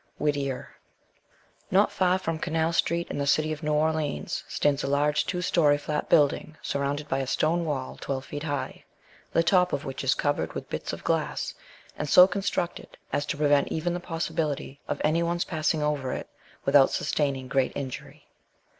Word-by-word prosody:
Whittier. 140 Hz, -3 st, -2 dB, 0.9 s
NOT 195 Hz, +3 st, +4 dB
far 185 Hz, 0 st, +2 dB
from 165 Hz, -4 st, -3 dB
Canal 160 Hz, +1 st, 0 dB
street, 170 Hz, 0 st, +1 dB
in -, -, -3 dB
the 140 Hz, -, -1 dB
city 155 Hz, +2 st, +2 dB
of 155 Hz, -, -4 dB
New 150 Hz, -1 st, 0 dB
Orleans, 155 Hz, -, 0 dB
stands 145 Hz, -1 st, +1 dB
a -, -, -1 dB
large 145 Hz, +2 st, +2 dB
two 180 Hz, -2 st, -2 dB
story 150 Hz, -5 st, +4 dB
flat 150 Hz, +1 st, -3 dB
building 155 Hz, +1 st, +3 dB
surrounded 140 Hz, +1 st, -2 dB
by 135 Hz, -1 st, 0 dB
a 135 Hz, -, -2 dB
stone 165 Hz, +5 st, +1 dB
wall 135 Hz, -4 st, -3 dB
twelve 135 Hz, -1 st, -3 dB
feet 145 Hz, -, -6 dB
high, 145 Hz, -3 st, -4 dB, 0.5 s
the 165 Hz, -, +3 dB
top 180 Hz, +1 st, +3 dB
of 140 Hz, -, -2 dB
which 135 Hz, 0 st, -5 dB
is 135 Hz, -, +3 dB
covered 145 Hz, 0 st, -1 dB
with -, -, -7 dB
bits -, -, -3 dB
of -, -, -7 dB
glass, -, -, -1 dB, 0.5 s
and 150 Hz, -, -2 dB
so 180 Hz, -, +9 dB
constructed 190 Hz, -2 st, -3 dB, 0.2 s
as 145 Hz, -, 0 dB
to -, -, -2 dB
prevent 145 Hz, -1 st, +3 dB
even 170 Hz, +2 st, -1 dB
the 175 Hz, -, -2 dB
possibility 160 Hz, -5 st, -3 dB
of -, -, -2 dB
any 155 Hz, +3 st, +2 dB
one's 170 Hz, +1 st, 0 dB
passing 155 Hz, -2 st, 0 dB
over 145 Hz, -4 st, -1 dB
it -, -, -5 dB, 0.4 s
without 140 Hz, -1 st, +6 dB
sustaining 135 Hz, -3 st, -1 dB
great 135 Hz, 0 st, +1 dB
injury. 130 Hz, -3 st, -6 dB
150 Hz, 180 wpm, -27 LUFS, 140-165 Hz, 0.9 s, so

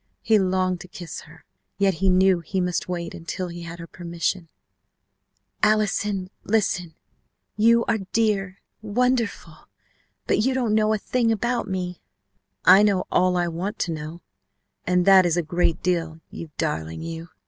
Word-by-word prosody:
He 220 Hz, -2 st, +4 dB
longed 185 Hz, -1 st, 0 dB
to -, -, -10 dB
kiss 175 Hz, -1 st, -8 dB
her, 160 Hz, +1 st, -17 dB, 0.3 s
yet 195 Hz, -4 st, +1 dB
knew 190 Hz, -1 st, +4 dB
he 180 Hz, +3 st, -3 dB
must 180 Hz, 0 st, -1 dB
wait 170 Hz, -2 st, -4 dB
until 180 Hz, +2 st, -5 dB
he 175 Hz, 0 st, -8 dB
had 170 Hz, 0 st, -8 dB
her 170 Hz, -, -8 dB
permission 170 Hz, 0 st, -3 dB, 1.1 s
"Allison! 210 Hz, -2 st, +1 dB
Listen! 180 Hz, -6 st, 0 dB, 0.6 s
You 230 Hz, +2 st, +4 dB
are 220 Hz, -, 0 dB
dear 200 Hz, -4 st, 0 dB, 0.2 s
wonderful 220 Hz, -6 st, -1 dB, 0.6 s
but -, -, +1 dB
you 260 Hz, +4 st, +1 dB
don't 240 Hz, -5 st, 0 dB
know 215 Hz, 0 st, +3 dB
a 220 Hz, -, +2 dB
thing 230 Hz, +2 st, 0 dB
about 235 Hz, +1 st, -1 dB
me!" 180 Hz, -2 st, -4 dB, 0.6 s
"I 195 Hz, -, +8 dB
know 200 Hz, -3 st, +2 dB
all 180 Hz, 0 st, +3 dB
I 175 Hz, 0 st, +1 dB
want 185 Hz, +6 st, -4 dB
to 170 Hz, -, -1 dB
know, 155 Hz, +2 st, -7 dB, 0.6 s
and 180 Hz, 0 st, +2 dB
that 195 Hz, -1 st, +8 dB
is 175 Hz, -1 st, +1 dB
a 175 Hz, -, +1 dB
great 170 Hz, +1 st, 0 dB
deal, 165 Hz, -3 st, -1 dB
you 165 Hz, -, -8 dB
darling, 80 Hz, -, -3 dB
you!" 165 Hz, 0 st, -7 dB
185 Hz, 155 wpm, -24 LUFS, 170-210 Hz, 1.1 s, I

